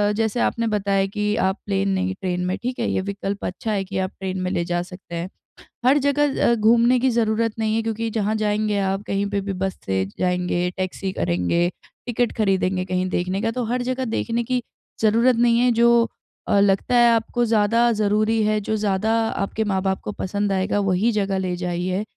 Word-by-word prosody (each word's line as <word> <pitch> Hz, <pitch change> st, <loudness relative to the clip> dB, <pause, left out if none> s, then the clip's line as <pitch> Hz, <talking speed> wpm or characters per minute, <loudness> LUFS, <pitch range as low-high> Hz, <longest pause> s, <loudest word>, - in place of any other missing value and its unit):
जैसे 220 Hz, +2 st, 0 dB
आपने 230 Hz, -1 st, 0 dB
बताया 200 Hz, -2 st, +1 dB
कि 210 Hz, +1 st, -1 dB
आप 190 Hz, +1 st, +1 dB
प्लेन 195 Hz, -1 st, 0 dB
नहीं, 190 Hz, 0 st, 0 dB
ट्रेन 180 Hz, -1 st, -1 dB
में 185 Hz, +1 st, -1 dB
ठीक 250 Hz, +1 st, -3 dB
है? 235 Hz, -, 0 dB
ये -, -, 0 dB
विकल्प 200 Hz, 0 st, -4 dB
अच्छा 215 Hz, +4 st, -3 dB
है 195 Hz, -2 st, 0 dB
कि 190 Hz, 0 st, -5 dB
आप 185 Hz, 0 st, -1 dB
ट्रेन 190 Hz, -1 st, -3 dB
में 185 Hz, -, -1 dB
ले 170 Hz, -, 0 dB
जा 175 Hz, 0 st, -1 dB
सकते 180 Hz, -1 st, -10 dB
हैं। 170 Hz, +2 st, -4 dB, 0.6 s
हर 270 Hz, +3 st, +5 dB
जगह 285 Hz, 0 st, +1 dB
अ, 235 Hz, -, +4 dB
घूमने 235 Hz, +3 st, +4 dB
की 260 Hz, +1 st, +2 dB
ज़रूरत 225 Hz, -1 st, +1 dB
नहीं 220 Hz, 0 st, 0 dB
है 225 Hz, -, +1 dB
क्योंकि 225 Hz, 0 st, -2 dB
जहाँ 215 Hz, 0 st, 0 dB
जाएँगे 210 Hz, -1 st, 0 dB
आप 195 Hz, +1 st, -1 dB
कहीं 195 Hz, +1 st, 0 dB
पे 200 Hz, -1 st, -1 dB
भी 195 Hz, 0 st, -4 dB
बस 190 Hz, 0 st, -3 dB
से 95 Hz, 0 st, 0 dB
जाएँगे, 180 Hz, -1 st, 0 dB
टैक्सी 190 Hz, +1 st, -3 dB
करेंगे, 90 Hz, -, 0 dB, 0.4 s
टिकट 245 Hz, -1 st, 0 dB
खरीदेंगे 190 Hz, -3 st, +1 dB
कहीं 185 Hz, 0 st, -1 dB
देखने 185 Hz, +3 st, -1 dB
का 225 Hz, -, 0 dB
तो 250 Hz, +2 st, -3 dB
हर 245 Hz, +2 st, -1 dB
जगह 255 Hz, 0 st, -2 dB
देखने 235 Hz, 0 st, -1 dB
की 250 Hz, +1 st, -1 dB, 0.4 s
ज़रूरत 230 Hz, +3 st, +4 dB
नहीं 235 Hz, 0 st, +4 dB
है 245 Hz, 0 st, +4 dB
जो 235 Hz, 0 st, +5 dB, 0.4 s
अ, 200 Hz, -, +3 dB
लगता 200 Hz, +4 st, +2 dB
है 240 Hz, 0 st, +6 dB
आपको 230 Hz, +2 st, +1 dB
ज़्यादा 230 Hz, +2 st, +3 dB
ज़रूरी 215 Hz, +1 st, +1 dB
है, 215 Hz, 0 st, +2 dB
जो 220 Hz, -, -2 dB
ज़्यादा 205 Hz, +1 st, 0 dB, 0.2 s
आपके 200 Hz, +2 st, -2 dB
माँ-बाप 190 Hz, -1 st, 0 dB
को 210 Hz, -, -4 dB
पसंद 205 Hz, +1 st, -2 dB
आएगा 195 Hz, +2 st, 0 dB
वही 195 Hz, +6 st, +2 dB
जगह 195 Hz, -2 st, 0 dB
ले 185 Hz, -1 st, -2 dB
जाइए। 180 Hz, +2 st, -2 dB
205 Hz, 205 wpm, -22 LUFS, 190-230 Hz, 0.6 s, है